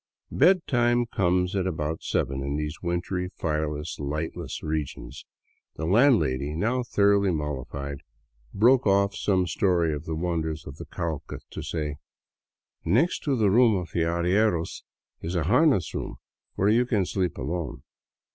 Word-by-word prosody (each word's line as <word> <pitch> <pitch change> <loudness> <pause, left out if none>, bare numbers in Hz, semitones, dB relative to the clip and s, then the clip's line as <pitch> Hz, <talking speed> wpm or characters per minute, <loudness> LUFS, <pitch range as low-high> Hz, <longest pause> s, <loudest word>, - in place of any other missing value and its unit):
Bedtime 125 -8 +3
comes 90 -4 0
at 95 -1 0
about 80 -2 -3
seven 65 +1 -1
in 70 +1 -2
these 75 +1 -4
wintry, 90 +1 -2
fireless, 75 -1 -2
llghtless 75 +3 -4
regions. 75 -4 -4 0.5
The 80 - -4
landlady, 80 - +3
now 115 +9 0
thoroughly 100 -4 +3
mollified, 70 -3 -4 0.5
broke 120 +4 +4
off 100 0 +3
some 95 -3 +1
story 90 -4 +1
of 75 - -5
the 80 - -3
wonders 80 -2 -2
of 70 +2 -9
the - - -8
Cauca 80 -4 -5
to - - -6
say: 75 -3 -3 0.5
" - - -68
Next 120 - +2
to 140 -3 +2
the 105 -5 +3
room 115 0 +5
of 90 -2 -4
the - - 0
arrieros 85 +1 +1 0.4
is 85 +3 -4
a 85 - +1
harness 100 - +3
room - - -4 0.4
where 95 - +1
you 120 +3 +3
can 105 -7 +1
sleep 90 -3 -2
alone. 70 -1 -4
85 Hz, 145 wpm, -26 LUFS, 75-100 Hz, 0.5 s, room